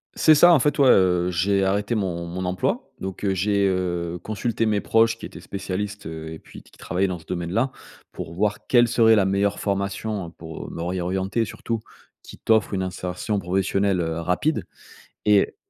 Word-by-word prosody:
C'est 155 - +6
ça, 175 +4 +7
en 160 - +5
fait, 150 +3 +1
ouais, 135 -2 +6
heu, 90 -3 +4
j'ai 95 +3 +1
arrêté 100 +3 0
mon 90 -6 -2
mon 90 +2 -5
emploi, 90 +1 -2
donc, 95 +1 -6
heu, 100 -1 +2
j'ai, 100 +1 +2
heu, 90 -2 -2
consulté 115 +1 -1
mes 105 -2 +1
proches 115 0 +3
qui - - -8
étaient - - -10
spécialistes, 100 0 -5
heu 80 0 -7
et 80 - -9
puis - - -14
qui - - -23
travaillaient 95 +3 -1
dans 90 -2 -4
ce 80 - -18
domaine-là, 90 +10 -1 0.4
pour 80 - -7
voir 105 +4 -1
quelle 120 -1 +5
serait 115 -1 +5
la 100 -3 +3
meilleure 100 +1 +1
formation 100 -1 -2
pour 80 -1 -9
me - - -6
réorienter, 95 +5 -1
surtout, 115 +2 -4 0.4
qui - - -12
t'offre 110 -2 +2
une 95 - 0
insertion 90 +3 -3
professionnelle, 95 +1 0
heu, 80 0 -2
rapide. 90 - 0 0.6
Et 105 -2 +3
95 Hz, 185 wpm, -23 LUFS, 90-105 Hz, 0.6 s, ça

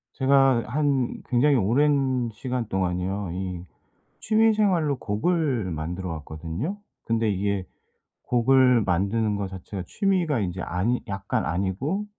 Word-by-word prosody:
제가 135 -3 +4
한 140 -1 0
굉장히 135 +3 +4
오랜 130 +2 +2
시간 125 0 -3
동안이요. 95 +1 -2
이 90 -1 -5 0.6
취미 220 0 +3
생활로 175 -9 +2
곡을 125 - 0
만들어 85 +4 -4
왔거든요. 80 - -5 0.3
근데 115 -1 0
이게 100 -1 -1 0.6
곡을 125 0 +4
만드는 100 +4 0
거 100 -1 -2
자체가 95 0 -7
취미가 175 - 0
인제 90 -2 -3
아니 105 +8 -1
약간 100 0 -2
아니고 100 - -1
115 Hz, 265 characters per minute, -25 LUFS, 95-140 Hz, 0.6 s, 제가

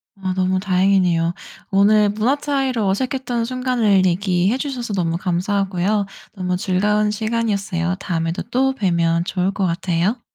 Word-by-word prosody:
아 190 -2 -3
너무 185 0 +1
다행이네요. 185 -3 +2 0.4
오늘 205 +2 +4
문화 220 +7 +1
차이로 270 -6 -1
어색했던 245 +2 -1
순간을 240 -6 +1
얘기해 185 +4 +1
주셔서 255 -5 -4
너무 170 -4 0
감사하고요. 195 +2 0 0.3
너무 180 -2 -2
즐거운 210 +3 +1
시간이었어요. 205 -5 -1
다음에도 170 -3 -2
또 265 +2 +2
뵈면 170 -7 +1
좋을 185 +1 -1
것 195 -1 -1
같아요. 180 +5 -1
195 Hz, 340 characters per minute, -20 LUFS, 180-225 Hz, 0.4 s, 오늘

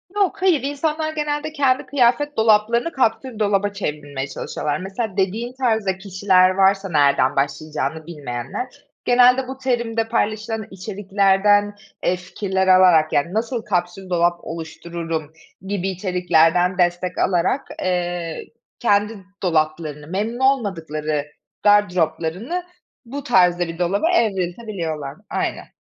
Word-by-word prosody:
Yok, 400 -1 +1
hayır 365 -6 +3
insanlar 310 +2 -1
genelde 300 0 -2
kendi 270 -4 +2
kıyafet 285 +2 +1
dolaplarını 225 +6 +3
kapsül 250 -3 -1
dolaba 205 -1 +2
çevirmeye 145 -7 -4
çalışıyorlar. 145 +2 -3
Mesela 195 +2 -4
dediğin 215 +6 -1
tarzda 220 -7 0
kişiler 190 -1 +3
varsa, 195 +1 +2
nereden 140 -4 +3
başlayacağını 150 +2 -2
bilmeyenler. 135 - -5 0.4
Genelde 250 +1 +5
bu 265 0 -6
terimde 235 -3 -1
paylaşılan 220 -1 -1
içeriklerden, 200 +1 +2 0.3
eee, 180 - +2
fikirler 190 +1 -2
alarak 180 -4 +5
yani 170 +5 +1
nasıl 230 +2 -1
kapsül 185 -1 -2
dolap 175 -1 +2
oluştururum 165 -1 -5 0.3
gibi 195 -1 -1
içeriklerden 180 -1 +2
destek 175 0 0
alarak, 185 +9 +1 0.2
eee, 175 -2 -2 0.3
kendi 210 -1 +2 0.3
dolaplarını, 155 -3 -1
memnun 210 +7 -3
olmadıkları 160 - -1 0.3
gardıroplarını 200 - +1 0.4
bu 275 +4 -6
tarzda 180 - +3
bir 165 +1 -7
dolaba 200 - +1
evriltebiliyorlar. 180 - -1
Aynen. - - -3
190 Hz, 110 wpm, -21 LUFS, 170-230 Hz, 0.4 s, Genelde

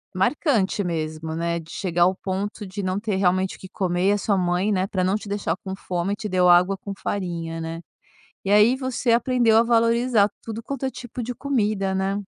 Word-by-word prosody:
marcante 205 - +1
mesmo, 160 -2 -3
né, 170 +1 -1
de 165 -1 -13
chegar 175 -3 0
ao 185 +2 +3
ponto 200 +3 -4
de 195 +2 -5
não 185 0 -1
ter 205 -2 -2
realmente 185 0 +1
o - - -18
que 190 - -10
comer, 180 -1 0
e - - +5
a - - +1
sua 205 0 +1
mãe, 180 +3 +1
né, 190 -1 +1
pra 190 -3 -1
não 190 +2 +2
te 210 -1 -5
deixar 200 -5 -1
com 190 -1 -4
fome 185 +1 -2
te 210 0 -5
deu 180 -2 +3
água 180 +2 +5
com 200 +1 -8
farinha, 170 -4 -3
né? 165 +1 -5 0.6
E 195 - -3
aí, 210 +4 +6
você 260 -2 -1
aprendeu 235 -1 +3
a 225 - +6
valorizar 230 -2 +3
tudo 225 0 -6
quanto 275 +1 -4
é - - +1
tipo 245 -1 -7
de 245 +1 -4
comida, 210 -8 0
né? 195 +1 0
195 Hz, 215 wpm, -23 LUFS, 180-225 Hz, 0.6 s, aí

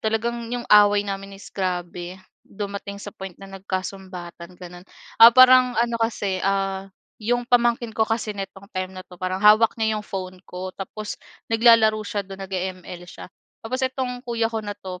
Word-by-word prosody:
talagang 230 +2 -2
'yong 245 -1 -3
away 205 -1 +6
namin 195 0 -6
is 195 - -12
grabe, 180 -1 -4 0.3
dumating 200 0 -6
sa 205 - -7
point 190 -2 -9
na 195 - -10
nagkasumbatan, 185 -2 -6
gano'n. 180 0 -11 0.4
Ah, 230 - +13
parang 255 0 +7
ano 235 0 +1
kasi, 205 -4 -1
ah, 195 0 -1 0.3
'yong 245 +3 0
pamangkin 235 -1 +2
ko 220 - +3
kasi 225 -1 -1
nitong 195 0 -8
time 185 0 -3
na 185 - -7
'to 180 - -14
parang 185 +1 -2
hawak 215 +2 +6
niya 220 -1 +1
'yong - - -13
phone 185 -1 -6
ko, 185 +1 -6
tapos 210 +2 -6 0.4
naglalaro 225 -2 +5
siya 205 -1 -3
do'n, 195 0 -10
nag-e-ML 185 -2 -5
siya. - - -10 0.4
Tapos 255 +3 -3
itong 255 -1 -3
kuya 230 -1 0
ko 225 -1 -2
na 205 0 -4
'to, 185 -2 -8
200 Hz, 170 wpm, -23 LUFS, 185-225 Hz, 0.4 s, Ah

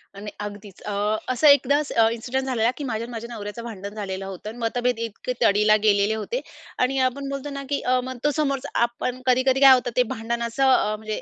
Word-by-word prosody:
आणि 205 +1 -7
अगदीच. 205 -2 -8
अ, 210 - -5 0.4
असं 275 +5 +3
एकदास 285 +1 +4
अ, 225 -1 +4
इन्सिडेंट 255 +3 -3
झालेला, 240 -3 +1
की 295 - -5
माझ्या 230 -3 -3
आणि 240 - -10
माझ्या 235 0 -6
नवऱ्याचं 205 +1 -7
भांडण 205 -3 -7
झालेलं 195 -2 -5
होतं 195 +2 -7
आणि 225 - -10
मतभेद 245 +1 -1
इतके 230 +2 -4
तडीला 210 -1 +4
गेलेले 205 0 +3
होते 465 - -3 0.4
आणि 260 +2 +1
आपण 275 +2 -7
बोलतो 275 +1 -5
ना 275 -1 -6
की 285 - -1
अ, 255 0 +2
मग 260 0 -6
तो 295 - +3
समोरच 275 -3 0
आपण. 240 +1 -1
कधी-कधी 260 +1 +3
काय 270 -1 +10
होतं 250 -1 +1
ते 250 - +6
भांडण 235 +1 -3
असं 260 +3 +2
अ, 215 -4 +2
म्हणजे 215 0 -5
235 Hz, 215 wpm, -23 LUFS, 215-260 Hz, 0.4 s, काय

